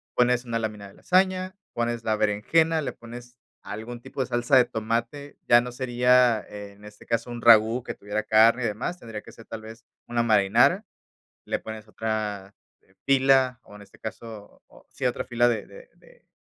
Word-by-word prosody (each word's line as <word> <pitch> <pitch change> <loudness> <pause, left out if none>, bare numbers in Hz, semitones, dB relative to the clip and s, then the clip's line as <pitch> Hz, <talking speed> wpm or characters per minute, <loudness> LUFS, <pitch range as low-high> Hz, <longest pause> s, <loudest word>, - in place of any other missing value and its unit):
Pones 125 0 +2
una 115 -1 -2
lámina 105 -2 -5
de 100 - -16
lasaña, 185 0 +1 0.2
pones 120 0 -2
la 110 - +1
berenjena, 155 +11 +1
le 140 - -4
pones 120 +1 -12 0.2
algún 110 +3 -8
tipo 135 - -6
de 130 - -1
salsa 120 +2 +1
de 130 - +7
tomate, 120 +6 -4
ya 120 - +7
no 125 0 -5
sería 125 -2 +3
en 105 0 -11
este 105 0 -14
caso 115 +1 -2
un 120 -1 -6
ragú 115 +1 +5
que - - -5
tuviera 105 +1 -4
carne 115 +3 +4
y - - 0
demás, 110 - -4
tendría 115 -7 -8
que 115 - -15
ser 115 - -14
tal 115 - -8
vez 110 +1 -12 0.2
una 120 0 0
marinara, 100 -4 +3 0.6
le - - -3
pones 110 -1 -8
otra, 105 -3 -4 0.3
eh, 95 - -31
pila, 135 -2 +3
o, 105 - -15
en 105 - -13
este 100 - -19
caso, 110 -1 -9
o - - -20
sí 130 - -3
otra 125 - -1
fila 120 -1 +2
de 120 - -2
de - - -14
de, - - -23
115 Hz, 190 wpm, -25 LUFS, 110-125 Hz, 0.6 s, de